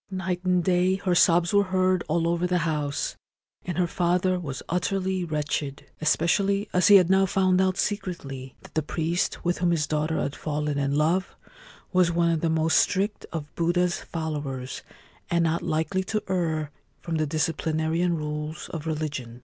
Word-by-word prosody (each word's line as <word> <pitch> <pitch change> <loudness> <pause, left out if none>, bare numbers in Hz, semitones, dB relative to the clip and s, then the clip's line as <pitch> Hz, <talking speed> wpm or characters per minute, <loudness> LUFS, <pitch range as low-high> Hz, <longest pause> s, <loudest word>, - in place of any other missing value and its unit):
Night 185 -1 -3
and 180 -1 +2
day 180 +1 +2
her 190 -2 -1
sobs 170 0 +4
were 200 0 +4
heard 185 -1 +1
all 165 +2 +1
over 170 +1 +1
the 180 0 +1
house, 150 -3 -2 0.5
and 175 -2 -4
her 180 - +3
father 180 +1 +1
was 140 -7 -6
utterly 185 +1 -1
wretched, 150 -3 -3 0.2
especially 195 +6 +2
as 180 0 +4
he 205 - +9
had 185 -3 +7
now 190 +1 +4
found 185 -1 +2
out 190 0 +1
secretly 170 -11 -3
that - - -15
the 155 - +1
priest 165 +4 -2
with 175 0 0
whom 175 0 +2
his 165 -3 +1
daughter 155 +1 -1
had 140 - -2
fallen 150 -1 -2
in 140 0 0
love 165 +5 +1 0.6
was 180 -2 +4
one 170 0 +2
of 160 -2 0
the 165 - +1
most 160 0 +3
strict 205 +2 0
of 150 -3 -6
Buddha's 175 +1 +1
followers, 145 -5 -4 0.5
and 170 -1 +2
not 165 0 +1
likely 170 +3 -1
to 215 +1 -2
err 160 -5 -1 0.3
from 165 -2 -3
the 155 -1 0
disciplinarian 160 +2 0
rules 150 0 -5
of 160 -1 -6
religion. 145 -7 -4
170 Hz, 175 wpm, -26 LUFS, 155-185 Hz, 0.6 s, he